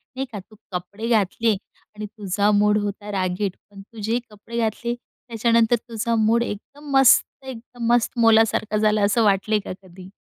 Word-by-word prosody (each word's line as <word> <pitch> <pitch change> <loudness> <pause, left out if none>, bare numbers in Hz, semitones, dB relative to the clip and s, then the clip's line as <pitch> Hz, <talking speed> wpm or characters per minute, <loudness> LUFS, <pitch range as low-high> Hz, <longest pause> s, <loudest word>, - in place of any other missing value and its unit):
नाही 265 +1 -3
का, 210 - -6
तू 205 +3 -17 0.2
कपडे 190 +5 -5
घातले 225 +1 +2 0.4
आणि 210 0 -6
तुझा 205 -1 -1
मूड 210 0 +3
होता 205 +1 -5
रागीट, 185 0 -2
पण 200 -1 -12
तू 220 +3 -15
जे 225 +3 0
कपडे 215 +3 -9
घातले 230 +1 -1
त्याच्यानंतर 230 -1 0
तुझा 230 +1 -1
मूड 225 +1 +2
एकदम 280 +8 -8
मस्त 270 -2 +6 0.2
एकदम 245 -1 -8
मस्त 240 -2 +2
मोलासारखा 225 -2 +3
झाला 215 0 +2
असं 210 +3 +2
वाटले 210 +1 +2
का - - -8
कधी? 185 0 -14
215 Hz, 165 wpm, -22 LUFS, 205-230 Hz, 0.4 s, मस्त